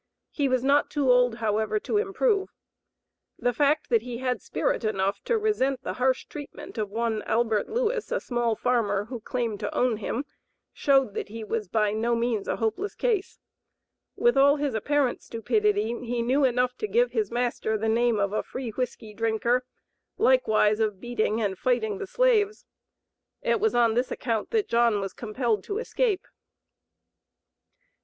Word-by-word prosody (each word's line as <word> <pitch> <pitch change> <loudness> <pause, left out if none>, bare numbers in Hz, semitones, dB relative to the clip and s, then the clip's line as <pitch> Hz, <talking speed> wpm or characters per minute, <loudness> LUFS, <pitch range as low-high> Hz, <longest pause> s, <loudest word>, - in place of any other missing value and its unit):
He 285 -3 0
was 255 -1 +1
not 280 +2 +3
too 280 -4 +2
old, 245 -2 +4
however, 220 - 0
to 415 - 0
improve. 410 -1 +1 0.9
The 245 - 0
fact 295 +4 +1
that 230 -2 +4
he 240 0 -6
had 250 -4 -2
spirit - - -1
enough 200 -2 -1
to 470 - +2
resent 275 - 0
the - - -3
harsh 260 0 +2
treatment 290 -5 -9
of 210 -2 -2
one 225 0 -1
Albert 225 -2 0
Lewis, 470 0 -1
a - - +1
small 240 -2 -1
farmer, 210 -5 0
who 240 +1 -6
claimed 230 -2 -3
to 210 - -4
own 245 -3 +2
him, 230 +6 -3 0.5
showed 270 -6 +2
that - - -4
he 225 +1 -7
was 215 -1 -3
by 210 +1 +1
no 230 +3 0
means 230 -3 -1
a - - 0
hopeless 225 - -2
case. 440 -6 -1 0.8
With 480 0 +3
all 280 +1 +6
his 290 -3 -1
apparent 270 +3 0
stupidity 215 -2 0
he 240 -1 -2
knew 265 +4 +3
enough 250 0 +1
to 430 - -2
give 480 +4 +2
his 435 -2 0
master 240 -2 -1
the 220 +1 -2
name 235 0 +2
of 200 0 0
a - - +1
"free 255 -3 -6
whiskey 220 -2 -4
drinker," 230 +3 +1 0.5
likewise 220 - +3
of 210 -3 0
"beating 225 -1 -1
and 200 -4 -2
fighting 220 -5 0
the - - -5
slaves." 430 -3 +2 0.8
It - - +2
was 440 +1 +1
on 235 -2 +4
this 245 +3 0
account 225 -4 -2
that 440 -3 0
John 235 -3 +3
was 195 -1 -4
compelled 225 -2 -1
to 405 - -3
escape. 450 -4 0
240 Hz, 170 wpm, -26 LUFS, 220-285 Hz, 0.9 s, all